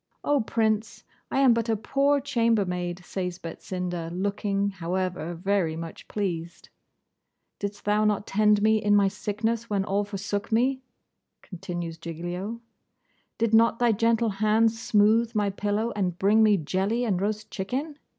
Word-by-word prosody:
'Oh, 290 -2 +2
Prince! 220 -1 -1 0.3
I 270 - +1
am 260 -3 +6
but 230 0 -1
a 225 - +3
poor 275 +6 +1
chambermaid,' 190 -9 0
says 180 -2 -4
Betsinda, 180 -1 -5
looking, 200 +2 -1
however, 180 -2 -3
very 180 -2 0
much 165 0 -8
pleased. 175 -5 -4 0.9
'Didst 205 0 -5
thou 210 +1 +2
not 210 -1 +1
tend 210 0 +3
me 220 0 +4
in 205 0 +4
my 200 -1 +5
sickness, 220 +4 -2
when 200 -2 0
all 205 0 0
forsook 200 +2 -4
me?' 260 +4 +2 0.6
continues 175 -2 -6
Giglio. 175 +7 -5 0.8
'Did 230 -1 0
not 230 +1 +5
thy 240 -1 +3
gentle 230 +1 +2
hand 215 +2 +3
smooth 225 +1 +2
my 205 -1 +1
pillow, 210 +3 -1
and 180 -4 -1
bring 205 +4 +4
me 210 -2 +5
jelly 190 +8 -1
and 190 -5 0
roast 215 +1 -3
chicken? 270 +10 -4
205 Hz, 145 wpm, -26 LUFS, 185-225 Hz, 0.9 s, am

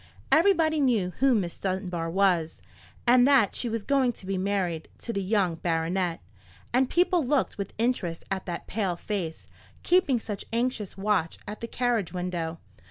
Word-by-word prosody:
Everybody 320 -3 +4
knew 225 -9 +2
who 270 -2 +4
Miss 180 -5 -2
Dunbar 185 -3 -2
was, 175 -3 +1 0.5
and 245 +1 +6
that 270 -8 +4
she 240 - -1
was 225 -1 -3
going 265 -2 +2
to 195 - -14
be 195 +1 -2
married 185 -4 -1 0.2
to 235 - -3
the 200 - -1
young 190 -4 +1
baronet; 170 +1 -1 0.5
and 255 +1 +3
people 355 -1 +3
looked 270 -4 0
with 200 - -5
interest 215 -8 -1
at 190 -1 -3
that 175 -1 -4
pale 195 -4 -1
face, 170 -3 -4 0.4
keeping 350 -9 +3
such 210 -3 -5
anxious 230 -4 -2
watch 195 -5 0
at 210 +1 -6
the 230 - -5
carriage 235 -7 -1
window. 175 -2 -3
200 Hz, 165 wpm, -27 LUFS, 180-245 Hz, 0.5 s, and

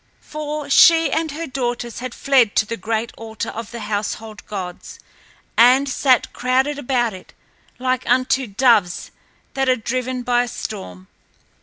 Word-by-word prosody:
For 300 -1 -5
she 325 +3 +6
and 320 0 0
her 315 +3 -5
daughters 245 -4 -3
had 250 -1 -6
fled 260 -6 +3
to 215 - +3
the 230 - -4
great 225 +3 -2
altar 220 -1 -5
of 225 -1 -7
the 235 -1 -7
household 215 +1 -4
gods 185 -4 -7 0.6
and 255 +4 +5
sat 260 -1 +2
crowded 260 +3 0
about 245 -4 0
it 185 - -12 0.4
like 255 -1 -1
unto 255 +1 +2
doves 205 -4 +2 0.4
that 270 -1 0
are 255 - +5
driven 255 +2 -3
by 245 0 +2
a 245 - -2
storm. 95 - -7
245 Hz, 150 wpm, -20 LUFS, 220-265 Hz, 0.6 s, she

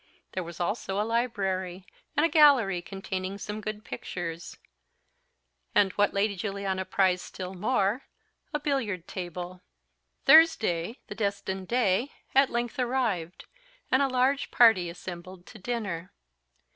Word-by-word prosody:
There 185 - -3
was 170 0 -9
also 195 +1 -2
a 210 - +1
library, 195 -6 -1 0.3
and 300 - +5
a - - +2
gallery, 275 - +5
containing 190 +1 -5
some 210 +1 -5
good 215 0 -5
pictures, 170 -1 -6 1.2
and, 195 -2 +5
what 205 +2 +2
Lady 200 +1 +1
Juliana 195 -1 -3
prized 185 -2 +2
still 185 0 -7
more, 205 +3 0 0.4
a 295 - -1
billiard 240 - -2
table. 180 0 -6 0.6
Thursday, 230 - +5
the - - -7
destined 200 -2 -3
day, 240 +1 +1 0.2
at 270 0 +5
length 240 +2 -2
arrived, 235 -9 -1 0.5
and 260 - +4
a 275 - +3
large 260 +2 +1
party 215 -8 +5
assembled 175 +1 -9
to 215 - -13
dinner. 190 -6 -4
200 Hz, 130 wpm, -28 LUFS, 185-240 Hz, 1.2 s, and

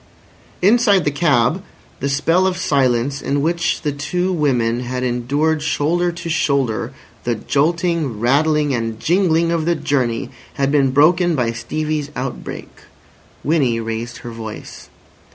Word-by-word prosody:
Inside 205 -3 +4
the 145 - +2
cab 145 +1 +2 0.4
the 140 - -1
spell 165 +7 +2
of 185 -1 -1
silence, 135 -2 +1
in 145 - -1
which 170 +2 0
the 150 - 0
two 180 +6 -2
women 125 -7 +1
had 125 +1 -3
endured 140 +6 0
shoulder 165 +4 0
to 170 0 -7
shoulder 135 -7 0 0.3
the 120 -1 0
jolting, 155 - 0
rattling, 145 +4 +2
and 115 -2 -3
jingling 170 - +2
of 165 -2 0
the 170 0 +2
journey, 130 -7 -1 0.2
had 140 -1 0
been 140 -2 +3
broken 165 +5 +4
by 120 -4 0
Stevie's 150 +5 -3
outbreak. 130 0 -5 0.7
Winnie 140 -7 +1
raised 115 +1 -4
her 120 - -5
voice. 110 -1 -9
145 Hz, 135 wpm, -19 LUFS, 125-165 Hz, 0.7 s, Inside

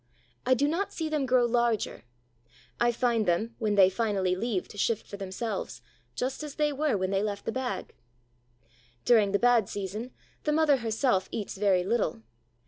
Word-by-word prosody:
I 255 - +5
do 285 +3 +2
not 345 +7 -1
see 320 -2 -3
them 300 -4 0
grow 250 -1 +4
larger. 235 - 0 0.7
I 240 0 +3
find 235 -2 +1
them, 215 +7 +1
when 215 -2 0
they 195 -2 +7
finally 190 -2 0
leave 205 -2 -2
to - - -12
shift 225 0 0
for 200 - -8
themselves, 195 +2 -4 0.3
just 260 +3 -2
as 300 -2 -7
they 300 -1 +1
were 290 -5 +1
when 185 0 -1
they 195 0 +1
left 205 -1 -3
the - - -1
bag. 250 -6 -4 1.1
During 215 -5 +5
the 200 - +3
bad 240 -3 +3
season, 205 +4 -5 0.3
the 300 - +1
mother 305 -2 +4
herself 225 -4 0
eats 210 - -4
very 190 -2 +2
little. 195 - -1
225 Hz, 175 wpm, -28 LUFS, 200-255 Hz, 1.1 s, they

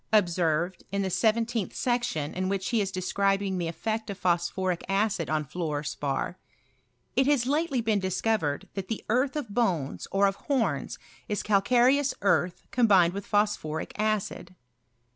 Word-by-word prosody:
observed, 175 -3 +1
in 200 0 0
the 190 - -2
seventeenth 225 0 +1
section, 240 - -1
in 185 +1 -1
which 195 -1 -1
he 230 -3 +2
is 195 -1 -2
describing 195 +1 0
the 170 - -1
effect 220 +6 -3
of 200 - -4
phosphoric 180 0 0
acidonfluor 165 -6 -1
spar, 145 +4 -3 0.4
" - - -43
It 265 - +3
has 285 -5 +3
lately 285 -1 +1
been 220 -2 +1
discovered 190 -5 -1
that 195 -2 -5
the 225 - -4
earth 255 +5 +2
of 295 -7 -3
bones, 180 - 0
or 195 +1 +3
of 195 0 +1
homs, 265 -5 -1 0.3
is 210 - -1
calcareous 250 +7 +3
earth 180 -3 +2
combined 195 -8 +4
with 200 0 -6
phosphoric 205 -7 0
acid." 210 -4 -2
200 Hz, 145 wpm, -27 LUFS, 175-225 Hz, 0.4 s, combined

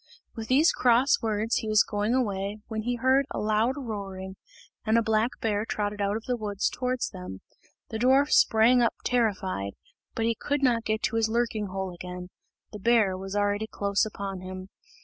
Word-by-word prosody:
With 225 -1 -7
these 285 +7 +5
cross 250 +3 +3
words 220 0 0
he 220 - -3
was 215 -1 +5
going 210 +4 -1
away, 200 -4 -1
when 220 -2 -3
he 245 +2 -1
heard 260 +3 +2
a - - -5
loud 215 +4 +1
roaring, 195 -6 -6 0.5
and 220 +1 +2
a 230 - +3
black 220 +1 +2
bear 210 -2 0
trotted 205 -2 -3
out 200 +1 0
of 225 - -9
the 250 - -1
wood 210 -3 -5 0.2
towards 250 0 -2
them. 180 - -8 0.5
The 220 - -3
dwarf 265 +4 +4
sprang 230 +3 +5
up 235 - +2
terrified, 190 - 0 0.4
but 225 - 0
he 230 - +2
could 285 +5 -2
not 235 -3 +2
get 215 0 -1
to 215 +2 0
his 225 -1 +2
lurking 225 -2 -1
hole 190 -1 -4
again 180 +1 -8 0.4
the 210 - -8
bear 220 -3 +3
was 195 +1 -6
already 205 +1 0
close 200 -2 0
upon 200 -3 -4
him. 185 0 -8
215 Hz, 190 wpm, -27 LUFS, 200-235 Hz, 0.5 s, these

